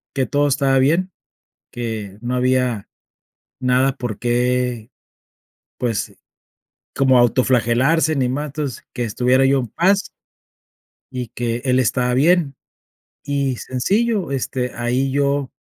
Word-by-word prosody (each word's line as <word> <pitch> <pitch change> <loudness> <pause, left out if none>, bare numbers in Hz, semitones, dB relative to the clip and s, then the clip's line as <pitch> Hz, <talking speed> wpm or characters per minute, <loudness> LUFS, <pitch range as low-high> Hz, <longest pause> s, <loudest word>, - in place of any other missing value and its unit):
que 135 -2 +1
todo 145 0 +1
estaba 135 -1 +2
bien, 165 +8 +2 0.6
que 110 -4 -5
no 120 +1 -3
había 125 -4 0 0.7
nada 130 +1 +2
por 120 -4 -5
qué, 125 -1 0 0.9
pues, 115 -4 -2 0.8
como 130 -2 +4
autoflagelarse, 130 +6 +2
ni 130 -3 +1
más, 145 +4 -2
entonces, 145 -2 -5
que 125 - -2
estuviera 125 +4 +2
yo 135 0 +3
en 125 - -2
paz 190 - +1 1.0
y 125 -2 -5
que 120 0 -3
él 130 -1 +2
estaba 125 0 +1
bien, 155 +1 +3 0.7
y 140 -2 -1
sencillo, 200 - -1
este, 125 -1 -2
ahí 125 +3 0
yo, 140 -1 0
130 Hz, 120 wpm, -20 LUFS, 125-140 Hz, 1.0 s, como